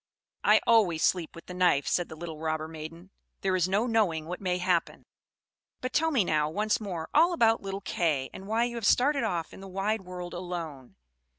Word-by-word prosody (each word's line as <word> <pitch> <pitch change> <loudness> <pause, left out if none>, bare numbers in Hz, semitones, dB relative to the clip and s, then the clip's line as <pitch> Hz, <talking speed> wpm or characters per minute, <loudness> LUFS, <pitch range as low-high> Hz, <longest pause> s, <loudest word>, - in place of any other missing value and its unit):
"I - - +5
always 200 -9 +4
sleep 175 -4 +1
with 170 - -11
the 180 - -8
knife," 180 -6 +3
said 175 - 0
the - - -8
little 160 -1 -7
robber 155 0 -2
maiden. 165 +3 -9 0.3
"There 190 -1 +1
is 185 0 +1
no 205 +5 +2
knowing 205 -10 +1
what 180 +4 -6
may 180 -2 0
happen. 180 -2 0 0.7
But 255 - -4
tell 320 +2 +3
me 265 -9 +3
now, 155 -3 +1
once 210 +6 0
more, 175 -6 -4
all 335 +4 +5
about 225 -8 +3
little 195 0 -5
Kay; 160 -8 0
and 190 - -9
why 225 +2 +2
you 240 0 -2
have 230 - -3
started 275 +3 +3
off 170 -2 -2
in - - -11
the 195 - -9
wide 195 +3 -1
world 180 -1 -7
alone." 170 -7 -6
180 Hz, 205 wpm, -28 LUFS, 165-215 Hz, 0.7 s, I